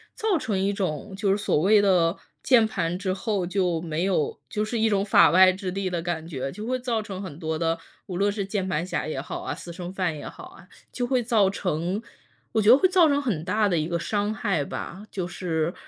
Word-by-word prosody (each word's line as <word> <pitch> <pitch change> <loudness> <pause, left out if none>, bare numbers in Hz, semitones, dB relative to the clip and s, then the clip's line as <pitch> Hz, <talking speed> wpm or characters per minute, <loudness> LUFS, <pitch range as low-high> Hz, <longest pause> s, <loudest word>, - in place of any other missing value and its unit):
造 425 -5 +1
成 225 -9 -2
一 195 +1 +1
种 190 0 -3
就 195 0 +1
是 195 - +2
所 205 - 0
谓 205 +4 +5
的 180 -3 +3 0.3
键 235 -4 +5
盘 175 -3 -2
之 190 -2 -1
后， 200 -1 -1
就 180 -3 0
没 165 0 -2
有 185 -6 0
就 210 0 -1
是 230 +2 -3
一 225 0 +2
种 200 -1 +1
法 205 - +6
外 185 +2 +7
之 185 0 -4
地 195 0 -2
的 175 -2 -2
感 165 -1 -3
觉， 135 -4 -4
就 210 +7 -7
会 255 +2 0
造 240 -3 -1
成 195 -3 -7
很 165 -5 -8
多 160 -2 -2
的 165 0 0 0.3
无 180 - -4
论 200 +2 +2
是 200 -1 -3
键 195 -1 -2
盘 165 -2 -1
侠 185 - -3
也 145 -4 -3
好 - - -6
啊， 140 - -3
私 170 +1 -9
生 175 +1 -7
饭 180 -5 -1
也 145 - -7
好 - - -10
啊， 185 - -15 0.2
就 245 -1 -2
会 255 -1 +1
造 220 -5 +3
成 180 +1 -2 0.5
我 220 - +2
觉 210 - +4
得 250 - +9
会 375 +6 +3
造 360 -3 +5
成 285 -1 +2
很 195 - -2
大 210 +2 +2
的 175 - +1
一 155 0 0
个 170 - -1
伤 205 +4 -1
害 195 -8 -1
吧， 190 +8 -7
就 185 -3 -3
是， 170 -2 -2
190 Hz, 260 characters per minute, -25 LUFS, 170-210 Hz, 0.5 s, 得